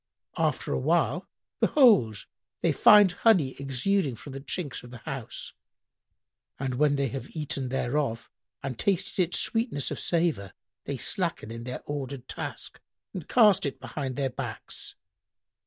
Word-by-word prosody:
After - - 0
awhile, - - +1 0.3
behold, 200 - +4 0.4
they - - +3
find 205 -3 +7
honey 180 - +3
exuding 140 +3 0
from 135 +4 -10
the 135 - -6
chinks 145 -1 -3
of 125 - -12
the 120 - -9
house,[FN#102] 125 0 -6 1.1
and 130 - -1
when 150 -1 +4
they 140 -2 0
have 135 +3 -7
eaten 140 -4 -2
thereof 125 -2 -1 0.4
and 130 -4 -4
tasted 195 -1 +1
its 180 -1 +2
sweetness 225 - +1
of - - -3
savour, 165 - 0 0.3
they - - -3
slacken 110 - 0
in 115 0 -7
their 125 0 -6
ordered 135 -3 -5
task - - -6 0.3
and 180 - -6
cast 210 -5 +5
it 140 - -3
behind 135 -4 -5
their 135 -2 -1
backs. 125 -3 -7
140 Hz, 140 wpm, -27 LUFS, 125-175 Hz, 1.1 s, find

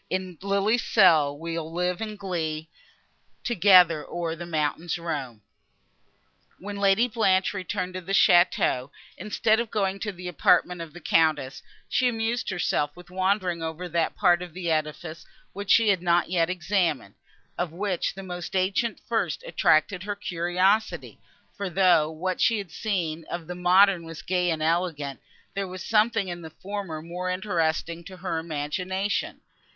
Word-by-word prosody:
In 185 -2 -3
lily's 200 +4 +1
cell 160 -9 +4
we'll 165 0 -5
live 180 +2 -1
in 215 -1 -4
glee, 165 -6 -3 0.8
Together 180 -7 +5
o'er 170 -2 -3
the 170 +1 -8
mountains 160 +1 -1
roam! 140 -10 -5 1.1
When 200 +1 -7
Lady 200 +4 +3
Blanche 195 -5 +2
returned 185 -1 -3
to 185 - -5
the 185 +2 -7
château, 175 -8 +4 0.3
instead 215 +3 +1
of 235 -2 -2
going 195 -2 -1
to 210 - -3
the 180 -1 -9
apartment 180 +1 +2
of 165 -2 -8
the 175 - -11
Countess, 155 -5 +1 0.3
she 255 - +2
amused 230 0 -1
herself 175 -5 0
with 180 0 -14
wandering 185 -2 0
over 165 +2 -4
that 170 -1 0
part 175 0 +3
of 175 -2 -8
the 175 -2 -2
edifice, 155 +1 -3 0.3
which 200 0 -7
she 225 -2 +5
had 190 -3 +2
not 175 0 +2
yet 170 -2 +2
examined, 170 - -1 0.4
of 175 -2 -2
which 185 +1 -2
the 195 - -8
most 180 0 -6
ancient 195 +5 0
first 215 -9 -1
attracted 155 +4 +2
her 205 +1 -4
curiosity; 185 +3 0 0.4
for, 200 -1 -4
though 175 -4 +4
what 180 +4 -3
she 230 - +3
had 195 -5 -6
seen 170 -7 -2
of 170 -1 -5
the 180 - -6
modern 180 +1 +4
was 165 -1 -9
gay 180 -1 0
and 160 -2 -1
elegant, 160 -4 -1 0.3
there 200 -1 -3
was 185 0 -7
something 220 -2 +2
in 175 -1 -5
the 160 - -8
former 185 -3 -6
more 180 +2 -4
interesting 170 -3 -1
to 185 +2 -11
her 180 -3 -3
imagination. 180 +6 -3
180 Hz, 155 wpm, -26 LUFS, 165-195 Hz, 1.1 s, Together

